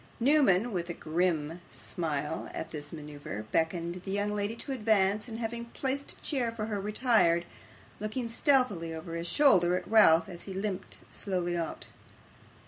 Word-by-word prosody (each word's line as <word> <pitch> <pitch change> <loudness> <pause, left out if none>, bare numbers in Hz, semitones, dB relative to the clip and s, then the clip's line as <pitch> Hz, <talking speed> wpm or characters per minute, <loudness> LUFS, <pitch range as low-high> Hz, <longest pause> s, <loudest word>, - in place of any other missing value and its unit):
Newman, 245 -5 +4
with 175 -3 -3
a 170 - -3
grim 165 0 -1
smile 155 -2 -3
at - - -5
this 145 -2 -5
manoeuvre, 145 -9 -7
beckoned 170 +2 0
the 195 - -7
young 205 +1 0
lady 205 +2 -1
to 255 - -3
advance, 210 -4 +2
and 225 -2 -6
having 235 0 -3
placed 270 +3 -3
a - - -21
chair 255 -6 -1
for 225 -2 -4
her, 210 -2 -2
retired; 210 -5 +3 0.5
looking 215 +3 -3
stealthily 230 - +2
over 165 +1 -7
his 170 +1 -3
shoulder 180 -12 +5
at - - -6
Ralph 170 -6 +6
as 175 -1 -7
he 195 - -6
limped 195 0 -4
slowly 180 -3 -1
out. 165 -2 -3
190 Hz, 160 wpm, -30 LUFS, 170-230 Hz, 0.5 s, Ralph